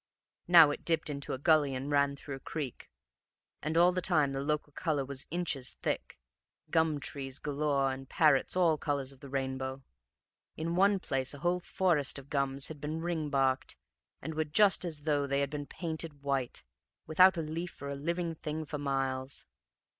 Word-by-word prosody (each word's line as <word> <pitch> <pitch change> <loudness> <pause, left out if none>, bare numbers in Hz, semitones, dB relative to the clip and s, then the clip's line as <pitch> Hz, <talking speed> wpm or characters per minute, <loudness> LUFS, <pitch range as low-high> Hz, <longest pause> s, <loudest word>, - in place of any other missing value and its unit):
Now 165 -4 +8
it - - -6
dipped 165 -2 0
into 140 -1 -5
a - - -2
gully 145 -1 +3
and 135 +3 -4
ran 140 -1 +3
through 140 0 -8
a - - -13
creek, 140 -3 -6 0.7
and 155 +2 -1
all 175 +1 +6
the 180 0 -1
time 155 -7 +3
the 135 - -2
local 150 0 -2
color 145 -4 -1
was 140 0 -6
inches 155 -7 -1
thick; - - -2 0.5
gum 160 -3 +2
trees 135 -1 -4
galore 140 -2 0
and 135 0 -9
parrots 150 -2 +3
all 165 -4 +3
colors 140 -3 -2
of 135 - -17
the 140 - -11
rainbow. 130 0 -3 0.7
In 165 +2 -2
one 195 +2 +4
place 135 -4 -1
a 140 - -10
whole 180 +1 +2
forest 175 -6 +1
of 140 0 -11
gums 140 -1 0
had 150 -2 -9
been 155 +2 -3
ring 165 -3 -2
barked, 135 -2 +1 0.5
and 160 +3 -4
were 155 0 0
just 190 +5 +4
as 155 -4 -4
though 145 -2 +1
they 140 0 +1
had 140 0 -1
been 145 -1 -5
painted 160 -4 -4
white, 135 - -2 0.4
without 180 +3 +6
a 165 - -1
leaf 165 +3 -5
or 140 - -5
a 140 - -3
living 170 +4 -2
thing 155 0 -5
for 150 0 -5
miles. 135 -1 -1
145 Hz, 185 wpm, -31 LUFS, 140-160 Hz, 0.7 s, Now